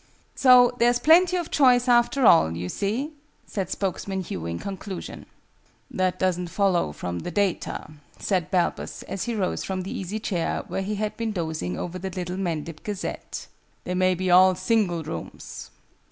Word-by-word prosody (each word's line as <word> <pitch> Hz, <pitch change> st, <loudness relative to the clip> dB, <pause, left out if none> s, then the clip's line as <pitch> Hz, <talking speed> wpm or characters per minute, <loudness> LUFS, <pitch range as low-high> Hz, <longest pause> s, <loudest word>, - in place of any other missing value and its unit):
"So 250 Hz, -2 st, +6 dB
there's 240 Hz, +1 st, +4 dB
plenty 340 Hz, +7 st, +5 dB
of 345 Hz, -2 st, -4 dB
choice, 250 Hz, -3 st, +4 dB
after 240 Hz, +2 st, +4 dB
all, 85 Hz, -, +5 dB
you 90 Hz, +1 st, -4 dB
see," 230 Hz, -, -2 dB, 0.3 s
said 190 Hz, -4 st, -4 dB
spokesman 190 Hz, 0 st, -2 dB
Hugh 85 Hz, -, -5 dB
in 85 Hz, 0 st, -3 dB
conclusion. 195 Hz, -, -7 dB, 0.6 s
"That 185 Hz, -1 st, 0 dB
doesn't 180 Hz, -1 st, 0 dB
follow 185 Hz, -, +1 dB
from 85 Hz, +3 st, -5 dB
the -, -, -5 dB
data," 200 Hz, -1 st, -1 dB, 0.3 s
said 185 Hz, -5 st, -1 dB
Balbus, 180 Hz, -2 st, -1 dB
as 190 Hz, -, -4 dB
he 235 Hz, -, -2 dB
rose 190 Hz, -4 st, -1 dB
from 190 Hz, -1 st, -3 dB
the 190 Hz, -, -5 dB
easy 195 Hz, +3 st, -4 dB
chair, 180 Hz, -6 st, -2 dB
where -, -, -3 dB
he 205 Hz, +2 st, -2 dB
had 210 Hz, 0 st, -2 dB
been 225 Hz, -2 st, -2 dB
dozing 160 Hz, -, -3 dB
over 180 Hz, +1 st, -5 dB
The 190 Hz, +1 st, -4 dB
Little 180 Hz, 0 st, -4 dB
Mendip 165 Hz, -4 st, -3 dB
Gazette. 205 Hz, -2 st, -5 dB, 0.4 s
"They 180 Hz, -, -3 dB
may 185 Hz, 0 st, +2 dB
be 185 Hz, 0 st, -1 dB
all 185 Hz, +1 st, +7 dB
single 185 Hz, -3 st, +1 dB
rooms. 160 Hz, +2 st, -7 dB
190 Hz, 170 wpm, -25 LUFS, 175-220 Hz, 0.6 s, all